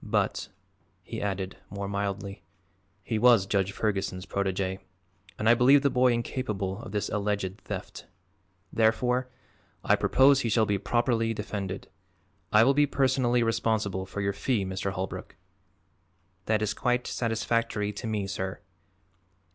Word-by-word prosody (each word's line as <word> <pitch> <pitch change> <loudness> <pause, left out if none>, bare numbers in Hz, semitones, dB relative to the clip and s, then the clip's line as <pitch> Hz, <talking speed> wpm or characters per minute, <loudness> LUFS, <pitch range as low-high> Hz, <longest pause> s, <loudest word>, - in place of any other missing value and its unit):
"But," - - -1 0.5
he - - -6
added, 95 -2 -3
more 100 +1 -5
mildly, 100 0 -3 0.6
"he 110 +4 -1
was 120 -4 +6
Judge 100 -1 0
Ferguson's 100 -3 -2
protegè 95 -1 -2 0.6
and 110 - -1
I 115 - +8
believe 135 +4 +5
the 140 - +3
boy 125 0 +4
incapable 110 -5 -2
of 110 - -9
this 105 -1 -1
alleged 100 -2 -2
theft. - - -7 0.7
Therefore 125 +3 +2 0.5
I - - +4
propose 135 +1 +5
he 120 - -1
shall 110 0 +3
be 100 -1 0
properly 115 +2 +1
defended. 100 -2 -5 0.6
I 105 +1 +7
will 135 +4 +5
be 145 +1 +4
personally 130 -3 +2
responsible 110 -4 0
for 100 - -5
your 100 0 0
fee, 105 0 0
Mr. 95 +1 -3
Holbrook." 95 0 -5 1.1
"That 110 -1 +2
is 105 - 0
quite 125 -1 0
satisfactory 115 -2 -1
to 110 +3 -6
me, 105 -2 -1
sir." 95 0 -4
105 Hz, 140 wpm, -28 LUFS, 100-120 Hz, 1.1 s, I